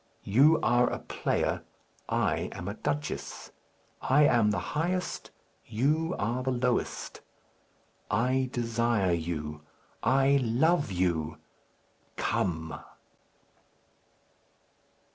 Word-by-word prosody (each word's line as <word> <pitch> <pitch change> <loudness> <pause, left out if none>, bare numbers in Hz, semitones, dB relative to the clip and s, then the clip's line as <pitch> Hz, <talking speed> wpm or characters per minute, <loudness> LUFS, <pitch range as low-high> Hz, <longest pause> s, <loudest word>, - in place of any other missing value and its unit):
You 140 +10 +5
are 120 0 +4
a - - -2
player; - - -1 0.5
I - - 0
am 90 - -7
a 100 - -2
duchess. 145 +6 -4 0.5
I 145 +3 +4
am 120 -7 +4
the 105 - 0 0.2
highest; 180 +4 -2 0.4
you 150 +9 +1
are 120 +4 -1
the 130 - -1
lowest. 125 -1 -1 0.9
I 130 +4 +1
desire 115 -5 +1
you! 75 -3 -3 0.4
I 135 +3 +4
love 135 - +2
you! 85 -4 0 0.8
Come!" 80 -3 -1
120 Hz, 90 wpm, -29 LUFS, 95-135 Hz, 0.9 s, You